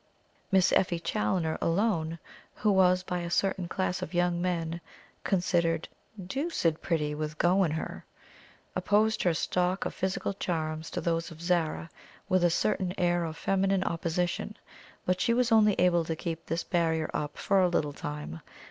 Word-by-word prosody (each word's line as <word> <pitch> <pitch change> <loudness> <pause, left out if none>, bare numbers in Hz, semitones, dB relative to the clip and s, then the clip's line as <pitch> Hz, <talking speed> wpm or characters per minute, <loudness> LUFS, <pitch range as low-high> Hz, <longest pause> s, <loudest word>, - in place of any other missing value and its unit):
Miss 190 -1 +4
Effie 175 -2 +2
Challoner 160 - -1
alone, 165 -3 +1 0.4
who 210 - +2
was, 185 -1 +4
by 180 -1 -2
a 170 0 -4
certain 190 0 0
class 185 0 -1
of - - -5
young 175 0 +1
men, 170 -2 -2 0.4
considered 170 -3 +1 0.3
"doocid 190 - -1
pretty, 150 -3 0
with 155 0 -4
go 185 +4 +4
in 170 - +1
her," 160 +1 -4 0.7
opposed 215 +2 +2
her 175 -3 +2
stock 180 +3 0
of - - -3
physical 190 +1 -2
charms 160 -4 -3
to - - -3
those 165 0 -1
of 165 -2 -12
Zara, 170 -2 0 0.4
with 185 -1 +2
a 175 - +5
certain 180 +1 0
air 175 -1 +2
of 160 0 -5
feminine 195 0 +1
opposition; 175 +4 -2 0.5
but 185 0 +1
she 235 - +3
was 250 -1 +2
only 215 -2 +6
able 175 -2 +3
to 160 - -2
keep 165 0 -5
this 165 +2 -1
barrier 160 -2 0
up 150 0 -3
for 195 -1 +2
a 180 - +4
little 150 -4 0
time. 145 - -6
175 Hz, 165 wpm, -29 LUFS, 165-190 Hz, 0.7 s, only